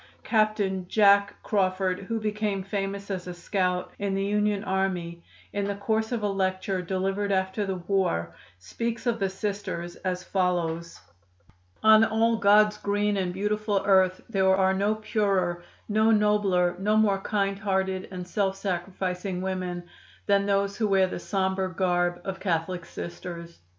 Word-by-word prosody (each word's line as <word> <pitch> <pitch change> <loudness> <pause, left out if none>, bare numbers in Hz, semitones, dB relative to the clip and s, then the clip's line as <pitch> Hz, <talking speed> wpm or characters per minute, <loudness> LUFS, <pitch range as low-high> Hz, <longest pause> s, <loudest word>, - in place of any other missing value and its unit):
Captain 210 -4 +1
"Jack" 200 0 +4
Crawford, 185 -2 0
who 230 -1 -1
became 210 -2 -2
famous 200 0 -4
as 185 -2 -4
a 180 - -6
scout 180 0 -1
in 200 -1 -1
the 195 0 0
Union 210 0 +1
army, 185 -4 -2 0.3
in 205 0 -1
the 200 0 -2
course 220 +2 -1
of 235 -3 -2
a - - +2
lecture 190 -1 -1
delivered 195 +3 -1
after 190 +2 0
the 190 - -1
war 175 - -1 0.2
speaks 230 - -4
of 235 -1 0
the 195 -1 +1
Sisters 190 -3 -4
as 180 -1 -3
follows: 170 -3 -1 0.8
"On 220 0 +7
all 225 +1 +2
God's 210 0 +4
green 205 0 0
and 185 -2 -1
beautiful 210 +1 -1
earth 190 -2 +4
there 190 -3 +3
are 190 0 +3
no 200 +3 +1
purer, 195 -5 0 0.2
no 215 +1 +3
nobler, 210 -5 +3
no 210 +2 +2
more 205 -3 +3
kind 195 0 -1
hearted 190 -2 -1
and 180 -2 -7
self 195 0 0
sacrificing 185 -1 -3
women 185 -2 -3 0.4
than 200 -1 +2
those 200 0 +1
who 220 - +1
wear 195 -1 +4
the 185 - -5
sombre 190 0 -1
garb 175 -1 +1
of 190 0 -4
Catholic 175 -1 -2
Sisters. 170 -1 -8
195 Hz, 150 wpm, -26 LUFS, 185-205 Hz, 0.8 s, On